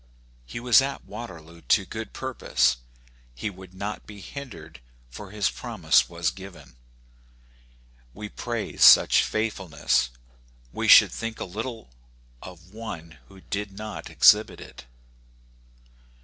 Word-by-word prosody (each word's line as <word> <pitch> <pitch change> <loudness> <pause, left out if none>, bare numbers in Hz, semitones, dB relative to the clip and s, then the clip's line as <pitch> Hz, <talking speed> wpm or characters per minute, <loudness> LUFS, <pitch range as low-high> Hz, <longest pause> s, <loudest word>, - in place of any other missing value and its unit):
He 90 - -6
was 120 0 +5
at 140 0 -4
Waterloo 85 -7 -10
to 100 +3 +2
good 110 +1 -7
purpose: 130 - 0 0.6
he 65 - -4
would 95 -1 -14
not 100 +2 -6
be 105 -1 -11
hindered, 95 - -10 0.3
for 100 +9 -9
his 105 0 -1
promise - - +1
was 85 -2 -1
given. 95 -10 -13 1.4
We 105 - -8
praise 115 0 -3
such - - +8
faithfulness; 85 - -1 0.6
we - - -2
should - - +8
think 115 -1 -5
little 110 - -6 0.5
of 90 +1 -13
one 85 -8 -8
who 95 -1 -16
did 100 +1 -5
not 105 +1 -7
exhibit 105 +1 +5
it. - - -12
100 Hz, 120 wpm, -25 LUFS, 85-110 Hz, 1.4 s, such